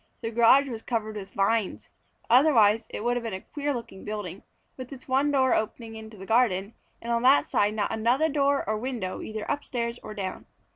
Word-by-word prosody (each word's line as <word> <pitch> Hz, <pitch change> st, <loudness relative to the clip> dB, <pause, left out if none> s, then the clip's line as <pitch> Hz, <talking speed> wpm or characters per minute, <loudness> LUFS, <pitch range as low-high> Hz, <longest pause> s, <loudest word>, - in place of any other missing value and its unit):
The 225 Hz, -, -3 dB
garage 240 Hz, +5 st, +5 dB
was 230 Hz, -4 st, -5 dB
covered 220 Hz, -3 st, -3 dB
with 195 Hz, -2 st, -8 dB
vines. 200 Hz, +1 st, 0 dB, 0.4 s
Otherwise, 230 Hz, -5 st, +5 dB
it -, -, -6 dB
would 240 Hz, +1 st, +1 dB
have 240 Hz, -, -4 dB
been 225 Hz, -4 st, -4 dB
a 190 Hz, -, -7 dB
queer 290 Hz, -1 st, -3 dB
looking 230 Hz, -7 st, -6 dB
building, 205 Hz, -3 st, -5 dB, 0.3 s
with 255 Hz, 0 st, -9 dB
its 265 Hz, -2 st, -11 dB
one 270 Hz, +2 st, +2 dB
door 265 Hz, -3 st, +3 dB
opening 225 Hz, +1 st, -3 dB
into 220 Hz, -1 st, -10 dB
the 190 Hz, -, -9 dB
garden, 220 Hz, -3 st, +2 dB, 0.3 s
and 235 Hz, -, -3 dB
on 235 Hz, -, +1 dB
that 265 Hz, +3 st, +5 dB
side 205 Hz, +1 st, +1 dB
not 210 Hz, -2 st, -1 dB
another 240 Hz, +8 st, +2 dB
door 280 Hz, -2 st, +1 dB
or 215 Hz, 0 st, 0 dB
window 230 Hz, -7 st, -4 dB
either 215 Hz, -1 st, -5 dB
upstairs 235 Hz, -4 st, -3 dB
or 215 Hz, -, -8 dB
down. 190 Hz, -2 st, -5 dB
230 Hz, 200 wpm, -26 LUFS, 210-255 Hz, 0.4 s, garage